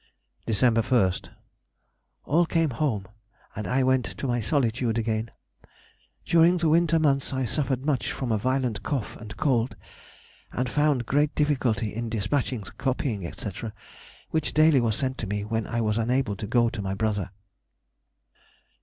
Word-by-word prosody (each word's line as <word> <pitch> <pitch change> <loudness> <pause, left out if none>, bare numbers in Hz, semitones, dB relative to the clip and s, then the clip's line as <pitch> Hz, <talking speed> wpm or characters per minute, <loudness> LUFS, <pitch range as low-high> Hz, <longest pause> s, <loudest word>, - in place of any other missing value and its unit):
December 115 +1 +3
1st.—All 125 - -2
came 165 -3 +1
home, 115 -7 -1 0.5
and 105 - -4
I 130 +1 +2
went 130 -2 +2
to - - -6
my 120 -2 +1
solitude 120 -2 +1
again. 110 0 -1 1.0
During 170 +2 +5
the 165 -2 +1
winter 165 +1 +4
months 140 -4 +1
I 130 -1 0
suffered 135 0 -1
much 145 -4 0
from 130 -3 -3
a 110 - +2
violent 130 -1 0
cough 135 -7 -3
and 110 -1 -10
cold, 125 -3 +1 0.8
and 125 +1 -1
found 145 -2 +1
great 145 +4 +1
difficulty 130 -8 +1
in 115 +1 -3
despatching 115 +3 -1
the 100 - -10
copying, 120 -8 -1
&c., - - -6 0.8
which 160 -1 -1
daily 155 -3 +5
was 115 -2 +1
sent 130 0 -2
to 110 - -3
me 105 +1 -2
when 110 0 -2
I 115 - -1
was 110 0 +1
unable 120 -2 +1
to 105 - -5
go 120 +1 +3
to 110 - -4
my 95 -1 -2
brother. 105 -2 -1
125 Hz, 155 wpm, -26 LUFS, 110-140 Hz, 1.0 s, During